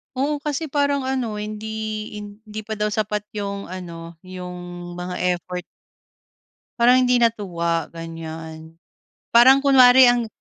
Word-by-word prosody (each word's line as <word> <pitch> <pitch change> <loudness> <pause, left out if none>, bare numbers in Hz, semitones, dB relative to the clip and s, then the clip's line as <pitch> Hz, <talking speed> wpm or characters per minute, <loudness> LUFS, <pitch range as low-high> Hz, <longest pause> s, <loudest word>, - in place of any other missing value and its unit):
Oo, 285 +3 0
kasi 300 0 -3
parang 285 -2 +1
ano 255 -5 -2
hindi 210 +1 -6 0.5
hindi 210 +1 -9
pa 220 - -11
daw 210 - +1
sapat 210 0 -2
yung 200 -1 -4
ano, 170 -2 -8
yung 180 -1 -8
mga 180 0 -5 0.2
effort. 180 +1 -6 1.2
Parang 250 +2 +6
hindi 250 - +4
natuwa, 170 -7 0
ganyan. 160 -1 -9 0.6
Parang 260 +4 +7
kunwari 255 -2 +7
ang 240 -2 0
210 Hz, 120 wpm, -22 LUFS, 175-245 Hz, 1.2 s, Parang